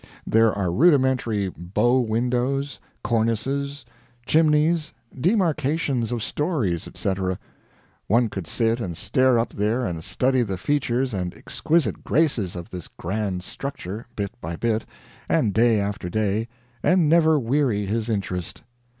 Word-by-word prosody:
There 115 0 +4
are 95 -4 -1
rudimentary 130 - +3
bow 100 +9 +1
windows, 125 +4 0 0.2
cornices, 135 +5 -1 0.4
chimneys, 155 +1 +3 0.2
demarcations 155 - +1
of 120 -3 -2
stories, 135 - -1
etc. 95 -1 -2 0.7
One 115 +3 +3
could 95 -6 -6
sit 115 +3 +1
and 90 -8 -4
stare 130 -1 +3
up 115 0 -1
there 110 +5 0
and 85 -5 -4
study 130 +6 +1
the 100 -5 -2
features 130 +2 0
and 90 -3 -3
exquisite 155 - 0
graces 125 - +1
of 90 +4 -7
this 90 -3 -7
grand 95 0 -3
structure, 115 -3 -6
bit 100 -2 -3
by 85 +2 -4
bit, 110 +4 -1 0.4
and 100 - +2
day 115 -1 +4
after 100 -3 -3
day, 110 +3 0 0.3
and 180 -3 +3
never 160 -1 +5
weary 125 -5 +1
his 110 +3 -2
interest. 95 -5 -3
115 Hz, 130 wpm, -24 LUFS, 100-140 Hz, 0.7 s, never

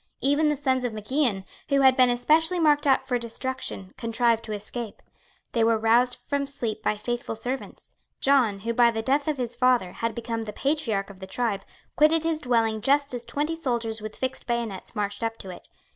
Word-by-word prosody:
Even 290 +3 +3
the 295 - 0
sons 260 -2 0
of 245 -2 -2
Mac 215 +2 -8
Ian, 245 -10 +1 0.2
who 280 -1 +3
had 265 -1 +6
been 255 -1 +5
especially 315 +8 +3
marked 295 -2 +3
out 265 -1 +3
for 250 -2 0
destruction, 235 -4 -5
contrived 230 -1 +1
to 220 - -7
escape. 210 +2 -6 0.5
They 230 - +2
were 225 0 +3
roused 240 +3 +3
from 280 -1 -1
sleep 240 -7 -3
by 210 -1 0
faithful 240 +1 -3
servants. 250 +4 -6 0.3
John, 245 -8 +3
who, 230 +3 -2
by 235 0 +5
the 225 -1 -3
death 280 +4 +1
of 305 -2 0
his 245 -2 -3
father, 245 -7 +2
had 230 +3 -3
become 230 -1 -3
the 215 -2 -6
patriarch 220 -8 -1
of 190 - -15
the 190 - -8
tribe, 200 -1 -2 0.3
quitted 310 +1 +4
his 325 -1 0
dwelling 225 -3 +1
just 280 +2 +2
as 245 -1 -4
twenty 295 +7 -2
soldiers 235 -7 -2
with 215 0 -7
fixed 260 0 -4
bayonets 235 -5 -3
marched 205 0 -2
up 225 0 -2
to 190 - -7
it. 180 - -12
240 Hz, 205 wpm, -26 LUFS, 220-275 Hz, 0.5 s, had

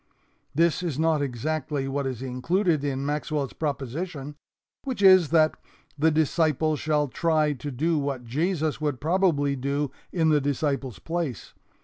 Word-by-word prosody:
This 165 +2 +3
is 165 -7 -3
not 160 -1 +2
exactly 140 +2 -2
what 135 0 -2
is 130 -1 -4
included 155 +6 0
in 135 -1 -2
Maxwell's 150 -1 -2
proposition, 145 +1 -4 0.5
which 255 -7 -3
is 185 -5 +7
that 155 -1 +4 0.4
the 155 +2 +3
disciple 155 0 +2
shall 150 0 0
try 155 -1 +1
to 145 +2 -6
do 155 +5 0
what 140 -3 -3
Jesus 155 +4 -1
would 145 -4 -1
probably 155 -3 +2
do 140 +2 -2 0.2
in 160 -3 +2
the 150 -1 +3
disciple's 140 -3 -1
place. 165 - -4
150 Hz, 140 wpm, -26 LUFS, 140-160 Hz, 0.5 s, is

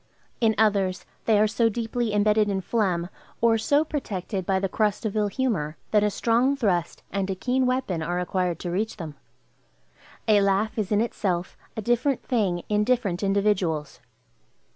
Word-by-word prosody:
In 220 -2 +3
others, 200 -3 +2 0.2
they 220 -2 +4
are 215 - +5
so 225 +2 +2
deeply 230 +1 -2
imbedded 210 0 +3
in 195 -1 -1
phlegm, 185 -5 0 0.3
or 225 -1 +3
so 285 +7 +2
protected 195 - -4
by 190 -1 +2
the 195 - 0
crust 210 +2 0
of 215 - -2
ill 210 -1 +2
humor, 195 - -1
that 210 - +4
a 210 - +3
strong 240 +6 +2
thrust 180 -9 -1
and 195 0 -1
a 190 - -1
keen 255 +6 0
weapon 250 -10 -1
are 175 +3 -2
required 180 -1 -1
to 175 - -3
reach 215 +5 -2
them. 165 -5 -6 1.1
A 210 -2 +5
laugh 200 +3 +1
is 210 -2 -2
in 210 0 +3
itself 185 -6 -2 0.2
a 220 - -3
different 240 +3 +1
thing 195 -8 0
in 210 0 +2
different 210 -7 0
individuals. 195 -9 0
210 Hz, 170 wpm, -25 LUFS, 185-225 Hz, 1.1 s, are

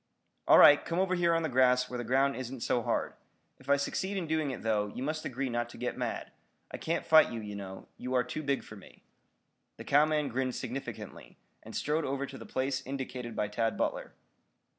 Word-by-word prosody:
"All - - +8
right, 145 - +8
come 165 - -3
over 185 0 +2
here 170 -2 +3
on 165 - +1
the - - +1
grass 125 -1 +3
where 125 -1 -5
the - - -3
ground 135 +3 +2
isn't 130 -1 -6
so 120 - +1
hard. - - -1 0.5
If 130 - -15
I 140 - +5
succeed 190 +7 -2
in 180 - -2
doing 155 -2 0
it, 130 - -6
though, 105 -2 +1
you 125 +5 -6
must 155 +2 -3
agree 135 +2 -2
not 120 -1 -2
to - - -12
get - - -3
mad. - - -4 0.4
I - - -5
can't 165 +1 -2
fight 160 -1 +6
you, 115 - -4
you 105 -1 -6
know. 95 -1 -8
You 125 +1 -3
are 125 - +3
too 125 +5 -5
big 140 -2 -1
for 105 - -11
me." 100 - -16 0.7
The - - -8
cowman 150 0 +3
grinned 130 +1 -1
significantly, 135 +1 -7 0.2
and - - -10
strode 155 +2 0
over 140 0 -2
to 135 -1 -10
the - - -10
place 130 0 -1
indicated 125 -3 -5
by 105 - 0
Tad 115 +2 -1
Butler. - - -2
130 Hz, 220 wpm, -30 LUFS, 120-150 Hz, 0.7 s, All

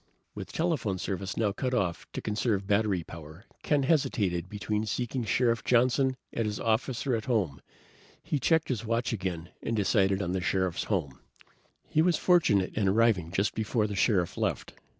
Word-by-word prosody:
With - - -7
telephone 155 - -1
service 95 0 -4
now 105 -3 +2
cut 125 +5 -2
off 90 -7 -2
to - - -5
conserve 105 -2 0
battery 100 -3 +1
power, 80 +5 -11 0.2
Ken 145 -2 +1
hesitated 110 - +1
between 105 +1 -2
seeking 125 +3 -2
Sheriff 115 +1 +1
Johnson 130 +2 +3 0.2
at 115 -2 -1
his 105 0 -3
office 115 +3 0
or 135 - +1
at 110 - -4
home. 100 - 0 0.6
He 150 - -1
checked 160 +4 +2
his 120 -6 -2
watch 115 +2 -1
again 90 -5 -4
and 115 - -2
decided 100 -2 +2
on 90 -3 -2
the 95 0 -1
Sheriff's 95 -1 0
home. 80 - -2 0.7
He 155 - +2
was 175 +1 +3
fortunate 115 - +3
in 105 -2 0
arriving 100 -5 +2
just 100 +3 0
before 110 0 0
the 105 -1 -3
Sheriff 95 -4 +1
left. - - -2
105 Hz, 170 wpm, -29 LUFS, 95-125 Hz, 0.7 s, Johnson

